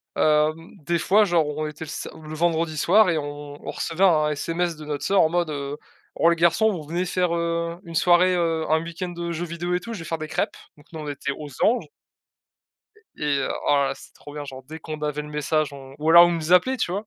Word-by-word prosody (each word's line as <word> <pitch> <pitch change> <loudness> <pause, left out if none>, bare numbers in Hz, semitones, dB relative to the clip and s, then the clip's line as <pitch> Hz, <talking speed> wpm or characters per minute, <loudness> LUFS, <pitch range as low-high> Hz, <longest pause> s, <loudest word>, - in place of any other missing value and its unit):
Hem, 155 +2 +2
des 170 +4 0
fois, 205 +5 +4
genre, 170 -4 +2
on 150 +1 -3
était 150 +1 -7
le - - -11
sa - - -5
le 155 0 -9
vendredi 165 0 0
soir 190 +7 +4
et 160 - 0
on 145 0 -8
on - - -6
recevait 165 +4 -2
un 155 -5 +4
SMS 165 +3 -2
de 155 - -9
notre 150 -1 -4
sœur 195 0 +3
en 160 - +4
mode, 175 -1 0
heu: 140 0 -4 0.4
«Oh, 165 - +3
les 170 - +3
garçons, 170 +6 +3
vous 175 -6 -5
venez 175 +3 -1
faire, 180 -1 0
heu, 170 0 -2
une 165 -3 -9
soirée, 180 +2 +4
heu, 165 -2 0
un 160 +1 +3
week-end, 170 +2 -5
heu, 170 0 -3
jeux 170 +1 -3
vidéo 175 +1 -4
et - - 0
tout, 230 +6 -7
je 210 - -6
vais 165 - -8
faire 165 +1 -3
des 155 - -5
crêpes». - - -2 0.2
Donc, 145 - -19
nous, 160 - -7
on 150 - -7
était 140 -1 -3
aux 145 +1 -7
anges. 240 +2 +3 1.3
E - - -8
et 145 -2 +1
heu, 135 - -1 0.2
oh - - +5
là 140 -1 +2
là, - - -3
c'était - - -16
trop 145 - -12
bien, 145 -1 -5
genre, 135 -2 -9
dès 155 +4 -9
qu'on 155 -1 -7
avait 150 0 -2
le 150 - -10
message 150 0 -1
on 135 -1 -11
ou 155 +2 +1
alors 170 +1 +9
elle 175 - 0
nous 165 +1 -2
appelait, 255 +9 +4
tu 200 -7 -1
vois? 205 +3 -3
160 Hz, 260 wpm, -24 LUFS, 150-175 Hz, 1.3 s, alors